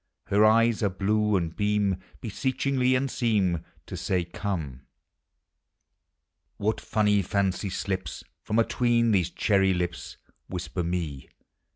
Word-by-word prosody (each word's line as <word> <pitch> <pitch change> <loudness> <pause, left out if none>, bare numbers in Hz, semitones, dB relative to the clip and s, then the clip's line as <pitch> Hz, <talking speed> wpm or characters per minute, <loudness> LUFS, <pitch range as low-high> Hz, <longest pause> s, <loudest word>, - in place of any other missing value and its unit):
Her 100 +2 +4
eyes 115 +1 +4
are 100 - +2
blue, 105 +2 +1
and 85 -3 -1
beam 105 -2 +1 0.2
Beseechingly, 130 +2 0
and 135 +1 0
seem 100 -8 +1 0.2
To - - -7
say, 90 -2 0
" - - -10
Come! 85 -8 -4 0.8
" - - -55 0.2
What 110 +2 -1
funny 105 -2 +2
fancy 100 +1 -1
slips 95 0 -4 0.2
From 110 - -2
a 115 - +6
I - - -7
ween 120 -1 +3
these 90 -4 +2
cherry 95 -1 +2
lips! 90 0 -4 0.3
Whisper 90 -1 -4
me. 85 -5 -3
100 Hz, 140 wpm, -27 LUFS, 90-110 Hz, 0.8 s, a